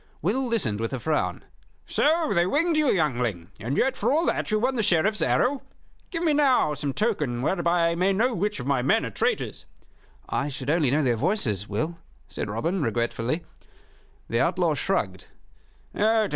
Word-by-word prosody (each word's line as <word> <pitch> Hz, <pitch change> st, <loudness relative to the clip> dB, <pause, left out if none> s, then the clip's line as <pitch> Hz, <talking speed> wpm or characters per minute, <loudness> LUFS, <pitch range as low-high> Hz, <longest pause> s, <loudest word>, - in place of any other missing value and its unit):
Will 250 Hz, +9 st, 0 dB
listened 175 Hz, -, 0 dB
with 115 Hz, +3 st, -3 dB
a 130 Hz, -, -2 dB
frown. 155 Hz, +5 st, -1 dB, 0.4 s
"So 320 Hz, +1 st, +2 dB
they 175 Hz, -1 st, +2 dB
winged 325 Hz, -, +1 dB
you, 305 Hz, -1 st, +2 dB
youngling, 120 Hz, -, 0 dB
and 120 Hz, +6 st, -3 dB
yet 265 Hz, -1 st, +2 dB
for -, -, 0 dB
all 320 Hz, +4 st, +2 dB
that -, -, -1 dB
you 215 Hz, -, +2 dB
won 255 Hz, +5 st, 0 dB
the 235 Hz, -, +1 dB
Sheriff's 205 Hz, +2 st, +2 dB
arrow? 265 Hz, +2 st, +2 dB, 0.5 s
Give 335 Hz, -2 st, -3 dB
me 315 Hz, -3 st, +3 dB
now 265 Hz, -, +3 dB
some 145 Hz, -1 st, -3 dB
token 150 Hz, -, -1 dB
whereby 170 Hz, 0 st, +2 dB
I -, -, 0 dB
may 185 Hz, +3 st, +2 dB
know 235 Hz, +6 st, +1 dB
which 205 Hz, 0 st, -1 dB
of 125 Hz, -, -5 dB
my 135 Hz, -2 st, +1 dB
men 130 Hz, -, +2 dB
are -, -, -5 dB
traitors." -, -, -2 dB, 0.6 s
"I 140 Hz, -, -1 dB
should 135 Hz, 0 st, -3 dB
only 155 Hz, -4 st, +2 dB
know 145 Hz, +4 st, +2 dB
their 120 Hz, -3 st, +1 dB
voices, 110 Hz, -, 0 dB
Will," 155 Hz, +12 st, -3 dB, 0.3 s
said -, -, -5 dB
Robin, 165 Hz, -, -1 dB
regretfully. 120 Hz, +5 st, -1 dB, 0.8 s
The -, -, 0 dB
outlaw -, -, +2 dB
shrugged. -, -, -2 dB
170 Hz, 175 wpm, -25 LUFS, -, 0.8 s, me